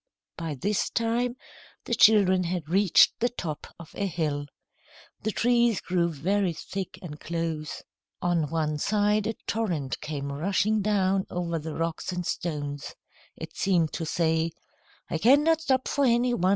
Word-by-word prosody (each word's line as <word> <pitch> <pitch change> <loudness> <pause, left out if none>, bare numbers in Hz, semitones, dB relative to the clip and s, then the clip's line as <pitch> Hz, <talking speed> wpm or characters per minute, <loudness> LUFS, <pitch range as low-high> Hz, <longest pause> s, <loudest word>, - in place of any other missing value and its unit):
By 165 -3 -4
this 200 +9 0
time, 235 +1 0 0.5
the - - -3
children 195 -5 +5
had 170 -3 -3
reached 190 +2 +5
the 240 - +2
top 160 -11 -5
of 170 - -12
a 200 - -1
hill. 150 -5 -2 0.7
The 215 - -1
trees 235 0 +2
grew 175 -2 0
very 180 +5 0
thick 190 +4 -6
and 150 -4 -8
close. 165 -2 -4 0.4
On 170 -4 0
one 155 -2 -1
side 210 +3 +2
a 225 - -2
torrent 175 -12 -2
came 140 -2 -4
rushing 195 +8 +1
down 195 -2 +1
over 170 -2 -2
the 155 0 -6
rocks 165 +2 -2
and 180 -1 -3
stones. 145 -5 -4 0.4
It 160 0 -8
seemed 175 -5 +1
to 165 - -3
say: 160 0 +1 0.6
"I 165 - -2
cannot 295 - +5
stop 260 -5 +1
for 285 - +1
any 245 -1 +3
one. 185 -5 +1
180 Hz, 150 wpm, -27 LUFS, 160-215 Hz, 0.7 s, children